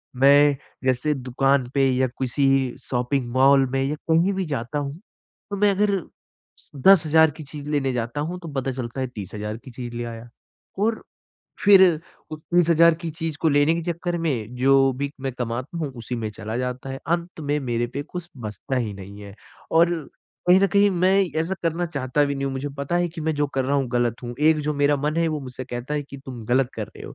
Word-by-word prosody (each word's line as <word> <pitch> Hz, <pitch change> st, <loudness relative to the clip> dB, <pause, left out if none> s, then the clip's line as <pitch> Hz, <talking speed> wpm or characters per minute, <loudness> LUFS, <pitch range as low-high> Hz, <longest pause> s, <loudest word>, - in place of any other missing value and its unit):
मैं 140 Hz, +2 st, +5 dB, 0.3 s
जैसे 130 Hz, +4 st, +2 dB
दुकान 135 Hz, 0 st, +1 dB
पे 135 Hz, -1 st, +3 dB
या 130 Hz, 0 st, +2 dB
किसी 135 Hz, +2 st, +1 dB, 0.4 s
शॉपिंग 125 Hz, 0 st, -1 dB
मॉल 135 Hz, +1 st, +5 dB
में 135 Hz, 0 st, 0 dB
या 140 Hz, +3 st, -1 dB, 0.2 s
कहीं 170 Hz, +5 st, +3 dB
भी 190 Hz, -1 st, -2 dB
जाता 140 Hz, -1 st, -3 dB
हूँ। 140 Hz, -1 st, -4 dB, 0.6 s
तो -, -, -1 dB
मैं 205 Hz, 0 st, +4 dB
अगर 200 Hz, 0 st, +2 dB, 0.9 s
10000 160 Hz, -4 st, +6 dB
की 155 Hz, +1 st, -10 dB
चीज़ 145 Hz, 0 st, -8 dB
लेने 135 Hz, -3 st, 0 dB
जाता 120 Hz, +3 st, -2 dB
हूँ 175 Hz, +4 st, -4 dB
तो 170 Hz, -, -9 dB
पता 135 Hz, -1 st, -1 dB
चलता 125 Hz, 0 st, -5 dB
है 130 Hz, -, -1 dB
30000 105 Hz, +1 st, -5 dB
की 130 Hz, +3 st, -13 dB
चीज़ 120 Hz, 0 st, -7 dB
ले 120 Hz, -, -3 dB
आया। 115 Hz, 0 st, -8 dB, 0.5 s
और 225 Hz, +1 st, 0 dB, 0.6 s
फिर 200 Hz, -2 st, +8 dB, 0.5 s
उस 155 Hz, 0 st, -7 dB
30000 170 Hz, 0 st, +4 dB
की 165 Hz, -, -3 dB
चीज़ 160 Hz, -1 st, -4 dB
को 165 Hz, -, +3 dB
लेने 145 Hz, +2 st, +3 dB
के 170 Hz, -, -2 dB
चक्कर 175 Hz, +1 st, -3 dB
में 120 Hz, -6 st, -2 dB
जो 135 Hz, +2 st, +4 dB, 0.2 s
भी 140 Hz, 0 st, -2 dB
मैं 135 Hz, -1 st, -3 dB
कमाता 125 Hz, +6 st, -4 dB
हूँ 150 Hz, -4 st, -2 dB
उसी 120 Hz, +1 st, -5 dB
में 110 Hz, -2 st, -3 dB
चला 110 Hz, +1 st, -6 dB
जाता 125 Hz, +1 st, -4 dB
है। 135 Hz, -, -5 dB
अंत 170 Hz, 0 st, -2 dB
में 145 Hz, 0 st, 0 dB
मेरे 120 Hz, -3 st, -1 dB
पे 140 Hz, -, -2 dB
कुछ 175 Hz, +3 st, -8 dB
बचता 110 Hz, +2 st, -5 dB
ही 110 Hz, -5 st, -2 dB
नहीं 100 Hz, +1 st, -10 dB
है 100 Hz, -1 st, -10 dB, 0.4 s
और 170 Hz, +1 st, +5 dB, 0.6 s
कहीं 185 Hz, +1 st, +7 dB
न 195 Hz, -, +5 dB
कहीं 200 Hz, 0 st, +5 dB
मैं 180 Hz, +2 st, +3 dB, 0.3 s
ऐसा 175 Hz, +4 st, -1 dB
करना 165 Hz, +1 st, 0 dB
चाहता 140 Hz, -3 st, 0 dB
भी 140 Hz, 0 st, -1 dB
नहीं 135 Hz, -, -3 dB
हूँ। 135 Hz, -, -2 dB
मुझे 135 Hz, +2 st, -3 dB
पता 140 Hz, +5 st, -1 dB
है 175 Hz, 0 st, +2 dB
कि 165 Hz, 0 st, -9 dB
मैं 160 Hz, 0 st, 0 dB
जो 145 Hz, 0 st, +1 dB
कर 135 Hz, -1 st, +1 dB
रहा 140 Hz, +2 st, +1 dB
हूँ 135 Hz, -, +1 dB
गलत 120 Hz, -1 st, +1 dB
हूँ। 120 Hz, 0 st, -5 dB
एक 155 Hz, 0 st, +4 dB
जो 150 Hz, +1 st, -1 dB
मेरा 145 Hz, 0 st, +3 dB
मन 150 Hz, +3 st, -1 dB
है 165 Hz, 0 st, +2 dB
वो 155 Hz, -2 st, -2 dB
मुझसे 130 Hz, -1 st, -7 dB
कहता 125 Hz, +3 st, -5 dB
है 150 Hz, -, -1 dB
कि 140 Hz, 0 st, -11 dB
तुम 120 Hz, -4 st, -7 dB
गलत 125 Hz, +2 st, +2 dB
कर 110 Hz, -, -3 dB
रहे -, -, -13 dB
हो। -, -, -9 dB
140 Hz, 220 wpm, -23 LUFS, 125-160 Hz, 0.9 s, फिर